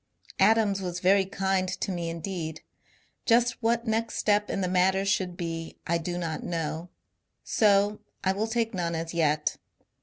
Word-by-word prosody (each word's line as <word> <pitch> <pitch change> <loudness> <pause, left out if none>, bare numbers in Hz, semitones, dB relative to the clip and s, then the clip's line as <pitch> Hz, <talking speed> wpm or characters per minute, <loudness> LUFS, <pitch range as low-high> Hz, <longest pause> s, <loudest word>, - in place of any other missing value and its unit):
Adams 205 -1 +4
was 180 -1 -3
very 190 +1 +4
kind 190 -1 0
to 185 +1 -3
me 170 -2 -3
indeed. 165 -1 -4 0.7
Just 240 +1 +3
what 235 +1 +1
next 225 0 -1
step 210 0 +2
in 195 - -1
the 185 - 0
matter 190 +2 +2
should 185 -3 0
be 165 -1 -5
I 170 0 +1
do 175 +2 -3
not 165 -3 -3
know; 165 0 -3 0.5
so 205 -1 +3 0.2
I 190 - +3
will 205 +3 -1
take 225 0 -1
none 170 -3 -1
as 165 +1 -4
yet. 155 -2 +1
185 Hz, 160 wpm, -27 LUFS, 170-205 Hz, 0.7 s, Adams